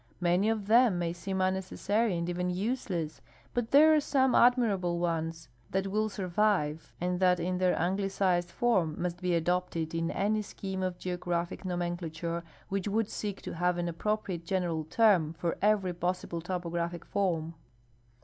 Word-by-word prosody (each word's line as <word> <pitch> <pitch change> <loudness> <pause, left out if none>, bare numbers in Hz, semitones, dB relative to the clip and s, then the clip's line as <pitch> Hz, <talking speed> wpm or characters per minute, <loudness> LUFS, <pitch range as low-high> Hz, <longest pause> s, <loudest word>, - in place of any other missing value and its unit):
INIany 180 +4 +2
of 215 -3 -2
them 230 -2 +5
may 170 -1 -1
seem 190 +2 -3
unnecessary 190 +2 0
and 170 0 -2
even 180 +1 -1
useless, 180 -5 -2 0.3
but 240 -2 -1
there 310 +3 +7
are 305 - +5
some 265 -3 +2
admirable 210 -8 +3
ones 165 -1 -2 0.2
that 195 0 0
will 215 +2 0
survive 185 -5 0
and 180 0 -1
that 180 -1 +4
in 180 +2 -1
their 185 -1 +2
an 175 +3 +1
glicized 190 -3 0
form 180 -8 +1
must 175 0 -3
be 180 -1 +1
adopted 170 -1 -1
in 165 0 -1
any 215 +2 0
scheme 190 -2 -5
of 185 -1 -2
geographic 175 -1 -3
nomenclature 175 -2 -3 0.2
which 195 0 -2
would 215 +1 0
seek 205 -2 -4
to - - -5
have 180 +1 +1
an 175 0 -1
appropriate 185 0 -2
general 170 -3 -1
term 175 -4 +3
for 165 +1 -2
every 200 -3 +2
possible 175 -1 -2
topographic 170 -1 -3
form. 170 -5 -1
180 Hz, 160 wpm, -30 LUFS, 170-200 Hz, 0.3 s, there